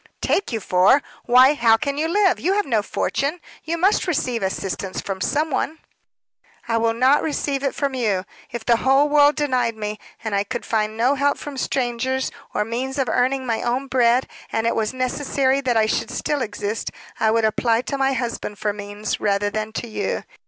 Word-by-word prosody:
"Take 400 - 0
you 225 - -1
for! 185 +8 +4 0.2
Why, 255 +3 +6
how 230 -5 +4
can 280 +2 -2
you 305 +3 0
live? 380 +1 +2
You 375 - +1
have 415 0 +1
no 225 -5 +1
fortune 280 - -2 0.2
you 335 +2 -2
must 380 +3 +2
receive 255 -8 0
assistance 190 0 -3
from 190 -1 -5
some 305 +9 0
one." 310 +4 -1 0.9
"I 230 -1 +1
will 225 0 +1
not 260 +5 +4
receive 285 -3 -1
it 275 -1 -1
from 280 -2 -1
you. 210 -7 0 0.3
If 235 -2 -6
the 235 -1 +4
whole 270 +4 +3
world 290 0 +5
denied 255 -6 0
me, 210 -1 -5 0.2
and 220 -2 -3
I 200 0 +2
could 205 - -5
find 215 -1 -1
no 245 +4 +3
help 285 +1 +1
from 290 -1 -7
strangers, 260 0 -1 0.2
or 210 - -1
means 255 +4 -3
of 265 -3 0
earning 260 +1 +1
my 230 -2 -1
own 250 +3 -1
bread, 250 -1 +2 0.2
and 225 - -1
it 230 - +1
was 220 -1 0
necessary 260 +1 0
that 250 -4 +1
I 220 - +4
should 215 - -1
still 295 -2 -2
exist, 210 -1 -3 0.3
I 220 - +3
would 225 0 +2
apply 225 +1 +2
to 280 - -3
my 270 0 +1
husband 235 -4 -3
for 210 +1 -1
means, 205 +1 -4
rather 205 0 +1
than 215 0 -3
to 235 - -4
you. 220 - -3
245 Hz, 200 wpm, -22 LUFS, 220-275 Hz, 0.9 s, Why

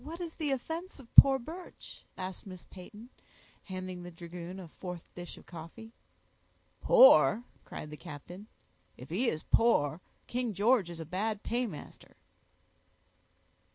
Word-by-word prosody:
"What 325 +4 -8
is 340 -2 -5
the 310 -3 -2
offense 320 +7 -4
of 245 -4 -16
poor 270 -1 +10
Birch?" 325 +8 -11
asked 185 +1 -6
Miss 185 -2 -10
Peyton, 210 +6 -12 0.5
handing 185 -1 -6
the 175 - -8
dragoon 175 +2 -9
a 180 - -9
fourth 180 +1 -9
dish 175 -1 -9
of - - -15
coffee. 175 +7 -11 0.9
"Poor!" - - +7 0.2
cried 150 - -8
the 150 - -8
captain. 170 +9 -10 0.5
"If 125 +5 -12
he 230 +8 +1
is 155 - -4
poor, 170 -9 +2 0.2
King 240 -4 -3
George 210 -1 +3
is 170 -1 -8
a 160 - -6
bad 205 +5 -3
paymaster." 235 -9 -5
195 Hz, 140 wpm, -31 LUFS, 175-245 Hz, 0.9 s, poor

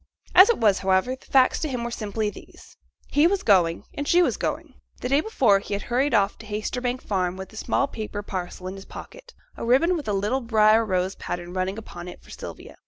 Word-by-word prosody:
As 375 +4 +8
it 470 - +3
was, 205 -4 +3
however, 190 +6 +1
the 260 - -22
facts 260 -1 +4
to 310 - -2
him 250 -3 -3
were 235 - -4
simply 215 -1 -2
these. 360 - -15 0.4
He 295 +3 +5
was 390 +1 0
going 175 -5 +3
and 285 0 -4
she 355 +1 +5
was - - +1
going. - - -4 0.3
The 250 - -4
day 280 +3 +3
before, 245 - +3
he 200 - -4
had 200 - -5
hurried 255 +2 +1
off 205 -1 +1
to 220 - -11
Haytersbank 245 +4 -3
Farm 185 -2 -1
with 190 +2 -9
a - - -12
small 245 - 0
paper 215 -4 -6
parcel 185 -2 -6
in 185 - -4
his 195 - -11
pocket - - -12 0.2
a - - -7
ribbon 270 +10 +3
with 300 -7 -5
a 210 - 0
little 210 +7 0
briar 220 -1 +4
rose 185 -2 -1
pattern 175 0 -6
running 185 +2 -2
upon 175 -5 -9
it 180 - -10
for - - -15
Sylvia. - - -10
220 Hz, 230 wpm, -24 LUFS, 195-265 Hz, 0.4 s, As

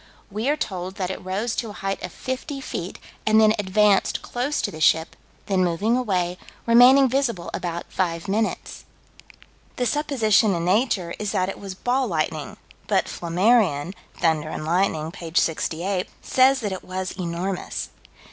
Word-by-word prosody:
We 215 +6 -1
are 300 - +2
told 185 -6 -4
that 185 -2 -2
it 190 - -7
rose 200 +5 -2
to 230 - -2
a - - -8
height 195 -1 -3
of 180 - -5
fifty 260 - -5
feet, 185 -8 -5 0.3
and 215 0 +4
then 215 -1 +6
advanced 205 0 +2
close 260 +5 -2
to - - -1
the 155 - -9
ship, 160 +1 +3 0.3
then 190 -2 +1
moving 180 +7 +1
away, 185 -7 -1 0.3
remaining 250 +4 +7
visible 240 -9 -1
about 170 -1 -4
five 170 -1 -1
minutes. 215 +3 -2 0.9
The 250 - -1
supposition 230 -8 +2
in 170 0 -2
Nature 190 -3 +1
is 210 -2 -2
that 185 0 +1
it - - -6
was 195 -2 -7
"ball 250 +5 0
lightning," 155 -4 -2 0.3
but - - +2
Flammarion, 180 -2 +2 0.3
Thunder 155 -2 +1
and 155 - -5
Lightning, 165 -2 0
p. 170 -3 -8
68, 180 +4 0
says 265 +1 +3
that 205 -3 -2
it 190 - -5
was 185 0 -4
enormous. 180 +1 -4
195 Hz, 160 wpm, -23 LUFS, 175-230 Hz, 0.9 s, remaining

